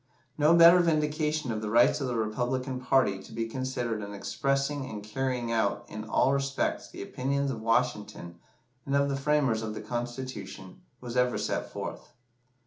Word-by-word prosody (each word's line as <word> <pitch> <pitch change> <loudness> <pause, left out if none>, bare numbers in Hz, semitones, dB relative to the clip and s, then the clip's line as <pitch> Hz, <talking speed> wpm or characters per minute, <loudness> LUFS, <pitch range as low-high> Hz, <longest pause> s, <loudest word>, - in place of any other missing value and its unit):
No 155 +3 +5
better 170 +1 +8
vindication 155 -3 +1
of 110 -1 -3
the 105 - -3
rights 120 +6 +4
of 135 - -1
the 125 - -2
Republican 125 +4 -1
party 125 -8 +2
to - - -14
be 115 0 -2
considered 125 -2 -3
as 100 - -6
expressing 135 +6 -1
and 105 -1 -7
carrying 120 +2 -2
out 110 -3 0
in 110 +1 -7
all 130 +4 +2
respects 135 0 -1
the - - -7
opinions 140 +2 -1
of 115 -4 -5
Washington 110 -7 -1 0.4
and 140 - -1
of 140 0 +3
the 140 - 0
framers 135 -5 +1
of 110 -1 -4
the - - -5
Constitution, 120 -6 -6 0.2
was 120 -1 -6
ever 125 0 +2
set - - -2
forth. - - -7
125 Hz, 170 wpm, -28 LUFS, 110-140 Hz, 0.4 s, better